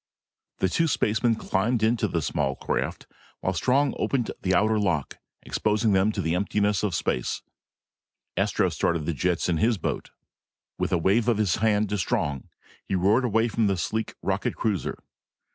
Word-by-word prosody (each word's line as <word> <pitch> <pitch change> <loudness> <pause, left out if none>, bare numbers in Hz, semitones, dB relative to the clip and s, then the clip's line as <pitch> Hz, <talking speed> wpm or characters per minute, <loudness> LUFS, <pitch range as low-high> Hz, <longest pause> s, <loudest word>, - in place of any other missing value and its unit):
The 95 - +2
two 165 - +1
spacemen 115 -4 +1
climbed 110 +3 0
into 115 +1 +2
the 85 -3 -1
small 65 -1 -1
craft, - - -3
and - - -34 0.3
while 95 - 0
Strong 130 - +2
opened 125 -5 0
the 95 0 +1
outer 110 +3 +3
lock, 90 -9 -1 0.2
exposing 105 +1 +1
them 95 +3 +3
to - - -2
the 80 +1 0
emptiness 100 +1 +1
of 100 -5 -1
space, 60 -6 -1 0.9
Astro - - +1
started 85 -3 0
the 85 - -1
jets 90 +3 0
in 85 -2 +1
his 115 +6 +2
boat. - - -3 0.7
With - - -1
a 90 - +3
wave 100 +7 +2
of 120 -3 +3
his 105 -5 +1
hand 105 -1 +2
to 105 - -1
Strong, 70 -6 -1 0.3
he - - -2
roared 105 +8 +3
away 115 0 +2
from 115 -2 +1
the 95 -1 +1
sleek 110 +6 -2
rocket - - -1
cruiser. 105 -6 -1
105 Hz, 175 wpm, -26 LUFS, 90-110 Hz, 0.9 s, outer